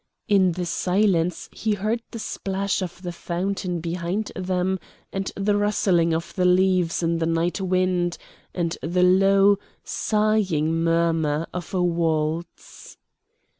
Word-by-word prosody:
In 190 -5 +4
the 180 +1 -3
silence 180 0 +1
he 220 -1 -1
heard 215 +4 -1
the - - -7
splash 195 -2 -2
of 180 0 -6
the 175 - -3
fountain 180 +1 -3
behind 175 +5 -3
them, 185 0 -1 0.3
and 195 0 -2
the 205 +1 +1
rustling 195 -5 +2
of 165 +1 -2
the 185 - 0
leaves 180 -1 +3
in 165 0 +1
the 165 - 0
night 165 +3 0
wind, 185 -2 +1 0.3
and 170 -2 -2
the 180 +3 +1
low, 195 +2 +5 0.2
sighing 210 -8 +1
murmur 165 -2 +1
of 180 -2 -6
a 180 - +2
waltz. 165 -1 -2
180 Hz, 130 wpm, -24 LUFS, 170-195 Hz, 0.3 s, low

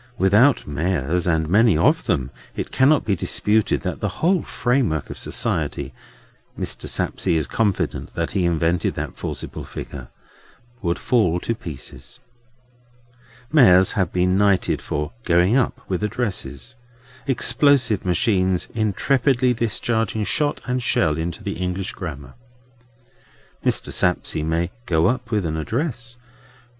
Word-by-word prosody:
Without 105 +9 +4
mayors, 80 +2 -1
and 80 -2 +1
many 105 0 +4
of 80 - +2
them, 65 -1 0 0.2
it - - -4
cannot 140 +3 +3
be 100 - +1
disputed 105 +4 +1
that - - -4
the - - -1 0.2
whole 180 -1 +3
framework 120 - -1
of - - -8
society—Mr. 70 -2 -4
Sapsea 85 -3 0
is 80 - 0
confident 105 -4 -1
that - - -2
he 95 -3 0
invented 85 0 0
that - - -5
forcible - - -5
figure—would 85 - -8
fall 100 -9 +1
to 115 - -1
pieces. 80 - -8 1.4
Mayors 95 - +6
have 95 -5 0
been 90 +1 +2
knighted 100 -2 +2
for 75 +2 -3
"going 90 +5 +3
up" 130 -3 0
with 95 -1 -2
addresses: 95 - -3 0.5
explosive 130 -4 +3
machines 95 -2 +1
intrepidly 125 +4 +1
discharging 115 -2 -1
shot 145 +6 0
and 125 0 -1
shell 120 -10 +2
into 80 +2 -4
the - - -4
English 90 +1 -3
Grammar. 70 -8 -7 1.3
Mr. - - 0
Sapsea 90 -3 +1
may 85 +2 -1 0.2
"go 80 -1 +2
up" 125 +2 0
with 105 -5 0
an 80 -1 -2
address. 120 - -3
95 Hz, 125 wpm, -22 LUFS, 85-120 Hz, 1.4 s, Mayors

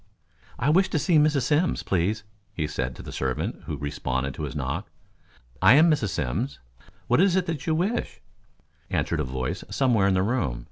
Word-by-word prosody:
"I 140 - +2
wish 190 +4 +4
to - - 0
see 160 +1 +3
Mrs. 150 -3 +3
Simms, 155 +4 +1
please," 100 +5 0 0.3
he 80 - -1
said 65 -4 -3
to - - -10
the - - -8
servant, 65 -2 -3
who 75 - -3
responded 70 -2 -2
to 75 - -6
his 75 - -7
knock. 75 +7 -3 0.7
"I 100 +7 +7
am 160 +3 +6
Mrs. 140 -9 +1
Simms. 90 - -2 0.5
What 125 +7 +3
is 190 -2 +4
it 165 -6 -1
you 160 - +2
wish?" 195 +9 -1 0.7
answered 80 - -1
a - - +1
voice 65 -1 -3
somewhere 120 -7 +2
in 95 - +2
the 95 - +2
room. 95 - -1
105 Hz, 185 wpm, -25 LUFS, -, 0.7 s, I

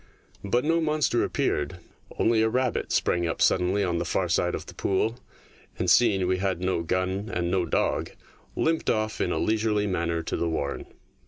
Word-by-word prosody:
But 120 +6 0
no 165 +2 +2
monster 155 -6 +1
appeared; 75 +4 -1 0.4
only 115 -1 +3
a 110 - +3
rabbit 125 0 -1
sprang 85 -1 +1
up 80 - -3
suddenly 95 +3 +2
on 85 -2 0
the - - 0
far 90 +1 -1
side 90 +1 +1
of - - -6
the - - -11
pool, 110 +5 -1 0.6
and, - - +1
seeing 100 -6 +4
we 90 +1 +1
had 95 -2 -1
no 90 -2 0
gun 95 +4 -1
and 85 0 -1
no 90 -2 +1
dog, - - 0 0.5
limped 160 0 0
off 110 -1 -1
in - - 0
a - - 0
leisurely 110 -1 +1
manner 85 -3 -1
to - - -3
the 85 - -1
warren. 70 -3 -3
95 Hz, 185 wpm, -26 LUFS, 85-110 Hz, 0.6 s, seeing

